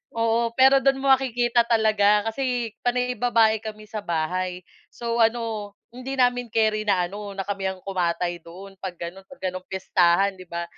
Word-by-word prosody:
Oo 230 0 +1
pero 265 +1 +6
do'n 270 0 +3
mo 275 - -1
makikita 245 -2 +3
talaga 215 -2 +3
kasi 245 -2 -2
panay 250 0 0
babae 225 -2 +3
kami 215 -1 -7
sa 215 - -4
bahay, 180 +2 -2 0.3
so, 235 0 -3
ano 225 -3 0 0.2
hindi 255 +3 -6
namin 245 -1 +2
keri 215 -1 0
na 185 -3 +3
ano 200 +2 -6
na 195 - -3
kami 195 -1 -3
ang 190 -1 -5
kumatay 175 -2 -1
doon 185 +4 -13
'pag 185 -2 -6
gano'n 175 +3 -8
'pag 275 - -15
gano'n 185 0 -3
piyestahan 190 +1 +2
'di 185 - -11
ba. 170 0 -4
215 Hz, 175 wpm, -24 LUFS, 185-240 Hz, 0.3 s, pero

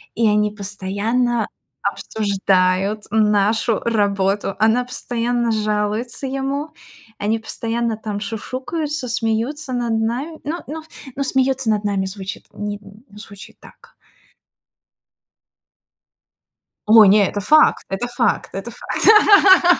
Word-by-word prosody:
и 230 -1 +2
они 210 0 +2
постоянно 210 +4 -1 0.4
обсуждают 195 -1 0
нашу 215 +1 +2
работу. 200 -3 0
Она 225 +4 +3
постоянно 240 -1 -2
жалуется 215 +4 -2
ему, 275 +3 -3 0.5
они 215 +2 -1
постоянно 230 0 -3
там 210 -2 -5
шушукаются, 260 +7 -4
смеются 240 +4 -2
над 240 -2 -1
нами. 255 +9 -3
Ну 315 +4 -3
ну 315 +2 -6 0.3
ну, 280 - -1
"смеётся 265 -2 +1
над 210 -1 0
нами" 200 -2 -1
звучит 190 0 -7
нин 205 0 -5 0.4
звучит 200 -2 -12
так. - - -18 2.9
Ой, 215 -1 +8
нет, 200 0 +5
это 205 - -4
факт, 305 +10 +4
это 195 +5 -3
факт, 240 -3 0
это 195 +5 -6
факт! 385 - +5
225 Hz, 105 wpm, -20 LUFS, 205-255 Hz, 2.9 s, Ой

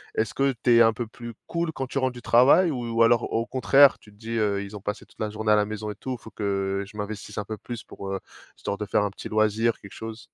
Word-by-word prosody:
Est-ce 110 - 0
que 135 0 +2
tu 120 -2 +5
es - - +7
un 115 0 +4
peu 120 +2 -4
plus 120 +1 -9
cool 170 -1 -1
quand 135 - -3
tu 135 - -5
rentres 130 -1 +1
du 120 - -10
travail? 135 +11 +5
Ou 120 -4 -1
alors, 115 0 +4
au 115 +1 0
contraire 135 +1 +5
tu 105 - -18
te - - -21
dis: 110 +1 -10
«Heu, 100 -2 +1
ils 100 +1 -8
ont - - -12
passé 105 +1 -4
toute - - -25
la 110 - -1
journée 110 0 -1
à - - +7
la 105 - +3
maison 105 0 -5
et - - -8
tout, 130 +5 -6
il - - -26
faut 110 - -12
que 100 -1 -1
je 105 - -16
m'investisse 105 0 -6
un - - -2
peu 110 +1 -5
plus 120 +2 -7
pour, 100 - -8
heu, 95 - -2 0.4
histoire 100 - -4
de 105 - -4
faire 105 - +1
un 105 - 0
petit - - -8
loisir, 110 +1 +2
quelque 100 - -13
chose?» 110 0 -7
110 Hz, 290 wpm, -25 LUFS, 105-120 Hz, 0.4 s, es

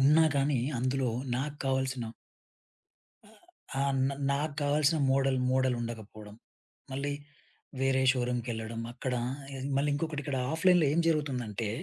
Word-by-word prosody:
ఉన్నా 150 +4 +6
గానీ, 140 -1 +2 0.2
అందులో 130 0 0 0.3
నాకు 145 +3 -3
కావాల్సిన 130 -2 0 1.2
ఆ! - - -18 0.5
ఆ! - - +3 0.3
నా 140 - -2 0.2
నాకు 145 +1 0
కావాల్సిన 150 +2 +3
మోడల్ 135 -1 +2
మోడల్ 130 -1 +2
ఉండకపోవడం, 110 -2 -7 0.6
మళ్ళీ 140 +2 -2 0.7
వేరే 135 0 +3
షోరూమ్‌కెళ్ళడం 120 -2 -2
అక్కడా 125 -1 -2 0.4
ఎళ్లి 135 +2 -4
మళ్ళీ 145 +1 +2
ఇంకొకటి 150 0 -2
ఇక్కడ 140 -2 -2 0.2
ఆఫ్‌లైన్‌లో 175 0 +4
ఏం 170 - +3
జరుగుతుందంటే 125 -9 0
135 Hz, 120 wpm, -30 LUFS, 125-145 Hz, 1.2 s, ఉన్నా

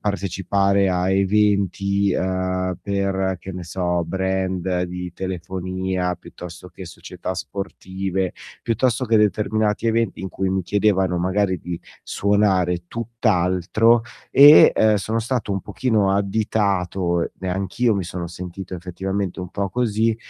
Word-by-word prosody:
partecipare 100 0 +1
a 90 +1 0
eventi, 100 0 +2
uhm, 95 0 -1
per 95 -1 -1
che 95 - -8
ne 90 - -6
so, 90 0 -1
brand 95 0 -1
di 90 0 -5
telefonia, 95 0 -3
piuttosto 90 0 -11
che 95 - -10
società 90 +2 -7
sportive, 95 0 -4 0.3
piuttosto 120 +2 +1
che 115 -1 +3
determinati 105 +1 +1
eventi 115 -3 0
in 95 - -4
cui 95 0 -2
mi 95 0 +1
chiedevano 95 -1 +1
magari 95 +1 0
di 85 0 -6 0.2
suonare 95 -4 +1
tutt'altro 110 -1 +2 0.3
e, 145 +2 +9
ehm, 110 -1 +4
sono 110 +3 -1
stato 120 -2 -2
un 95 - -1
pochino 110 -6 +1
additato, 95 -4 0
e 95 - -3
anch'io 100 +5 0
mi 95 - -2
sono 85 0 -5
sentito 90 +2 -7
effettivamente 95 +2 -4
un 90 - -6
po' 100 -1 -3
così, 115 -1 +1
95 Hz, 125 wpm, -22 LUFS, 90-105 Hz, 0.3 s, e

